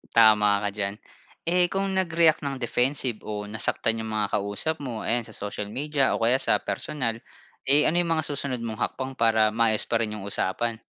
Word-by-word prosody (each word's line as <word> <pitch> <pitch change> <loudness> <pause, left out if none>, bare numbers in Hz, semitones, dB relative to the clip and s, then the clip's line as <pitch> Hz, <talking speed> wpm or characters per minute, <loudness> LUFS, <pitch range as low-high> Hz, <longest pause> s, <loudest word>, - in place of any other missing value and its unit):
Tama 105 -2 +5
ka 100 - -1
diyan. 100 0 -3 0.5
Eh, 175 +1 +2
kung 195 +2 -2
nag-react 170 -4 +2
nang 140 -2 -4
defensive 125 -1 0
o 105 -1 -4
nasaktan 115 +1 0
yung 110 - -4
mga 105 -2 -1
kausap 100 +11 -2
mo, 125 -6 -5
ayan 120 0 0
sa 110 - -12
social 105 0 -5
media 140 +4 0
o 115 - -2
kaya 125 +3 +3
sa - - +3
personal, 125 -7 -3 0.5
eh, 145 +2 +8
ano 175 +3 +3
yung 170 -1 +1
mga 155 - 0
susunod 140 -4 -3
mong 110 -2 -5
hakbang 130 0 -3
para 110 -2 +3
maayos 110 -1 +2
pa 115 - 0
rin 110 -2 -2
yung 105 - -7
usapan? 110 +3 -2
115 Hz, 190 wpm, -25 LUFS, 110-145 Hz, 0.5 s, eh